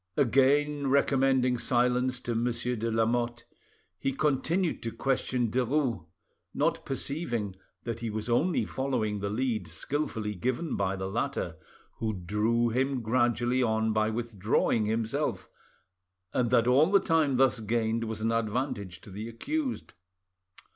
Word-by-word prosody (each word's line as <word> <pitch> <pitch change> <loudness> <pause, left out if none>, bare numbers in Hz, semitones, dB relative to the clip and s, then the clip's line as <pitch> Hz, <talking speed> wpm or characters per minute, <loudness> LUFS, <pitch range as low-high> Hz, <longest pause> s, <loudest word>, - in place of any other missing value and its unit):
Again 140 +2 +3
recommending 130 -2 +3
silence 125 +1 +1
to 120 - -2
Monsieur 120 +1 -1
de 115 +1 -2
Lamotte, 120 +1 0 0.5
he 135 - 0
continued 155 +6 0
to 115 - -3
question 125 -3 0
Derues, 125 - 0 0.5
not - - +1
perceiving 125 - -2 0.3
that 115 -1 -4
he 115 -1 -3
was 110 +1 -4
only 150 +9 +2
following 115 -6 -1
the 100 0 -2
lead 115 +1 -1
skilfully 110 -8 -3
given 130 - -2
by 100 -1 0
the 95 0 -4
latter, 95 - -2 0.4
who 110 -1 -1
drew 105 +6 +1
him 130 +1 0
gradually 120 +2 +2
on 110 -2 +1
by 110 0 +2
withdrawing 110 -1 0
himself, 110 +1 -1 0.9
and 125 -2 +1
that 120 -1 +4
all 135 +7 +5
the 200 0 +6
time 155 -7 +2
thus 130 -5 +3
gained 115 +1 0
was 110 -1 -5
an 115 +1 +1
advantage 110 -4 -2
to 100 - -13
the 105 +4 -6
accused. 275 - -3
120 Hz, 135 wpm, -29 LUFS, 110-135 Hz, 0.9 s, the